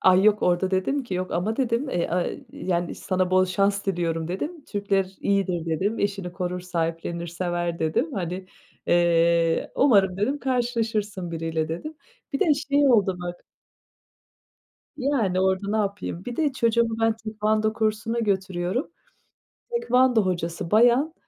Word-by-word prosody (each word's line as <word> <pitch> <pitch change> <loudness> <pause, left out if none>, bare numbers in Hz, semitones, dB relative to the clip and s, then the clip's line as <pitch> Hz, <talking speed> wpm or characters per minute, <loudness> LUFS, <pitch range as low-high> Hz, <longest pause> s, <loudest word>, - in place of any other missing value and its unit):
Ay, 185 0 +5
yok, 210 -1 +4
orada 180 +2 +2
dedim 230 +10 0
ki 190 - -5
"yok 185 0 -3
ama" 210 +6 -1
dedim. 255 +1 0
Eee, 175 - 0
aaa, 180 0 0 0.3
yani 175 -2 -2
"sana 185 -1 -1
bol 185 0 +5
şans 195 +2 0
diliyorum." 165 -3 -1
dedim. 295 - -4
"Türkler 195 -2 -1
iyidir" 185 -4 0
dedim, 190 +7 -1
"eşini 195 -3 -2
korur, 180 0 -3
sahiplenir, 170 -1 -3
sever" 175 0 -2
dedim. 160 - 0
Hani, 185 -1 -4 0.4
eee, 170 -1 +3
"umarım" 200 -9 +4
dedim 260 +9 0
"karşılaşırsın 225 -7 -1
biriyle." 160 -1 -2
dedim. 240 - -5 0.4
Bir 275 - -2
de 305 -3 +4
şey 280 0 +2
oldu 200 -6 +3
bak. 175 0 -6 1.5
Yani 240 -10 +1
orada 190 +1 +1
napayım? 200 -4 -2
Bir 240 -1 -5
de 300 -4 +1
çocuğumu 230 -2 +1
ben 225 0 +3
Tekvando 215 0 0
kursuna 220 +1 -1
götürüyorum. 190 - -1 0.8
Tekvando 260 - +3
hocası 170 -1 -3
bayan, 245 +8 +4
195 Hz, 140 wpm, -25 LUFS, 175-225 Hz, 1.5 s, Ay